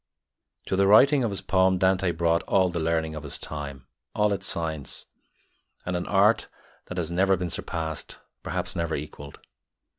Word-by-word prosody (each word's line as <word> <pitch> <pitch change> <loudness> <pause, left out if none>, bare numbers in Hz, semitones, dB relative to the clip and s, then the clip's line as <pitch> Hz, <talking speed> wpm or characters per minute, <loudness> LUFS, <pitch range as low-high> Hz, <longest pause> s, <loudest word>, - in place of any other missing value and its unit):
To - - -1
the 100 +1 +3
writing 135 +7 +6
of 115 - +1
his 100 -2 -4
poem 95 -1 +3
Dante 95 0 +2
brought 85 0 +1
all 95 -1 +3
the 85 -1 -3
learning 80 0 0
of 75 - -6
his 75 -2 -4
time, 70 -4 -7 0.3
all 105 -1 +2
its 100 - -4
science, 80 -4 -3 0.8
and 90 - -2
an 90 - -3
art 105 +3 +3 0.4
that 90 - -7
has 85 -1 -1
never 95 +2 +3
been 90 -1 -3
surpassed, 80 -2 -4 0.2
perhaps - - -3
never 85 -1 -1
equalled. 70 -1 -8
90 Hz, 170 wpm, -26 LUFS, 80-95 Hz, 0.8 s, writing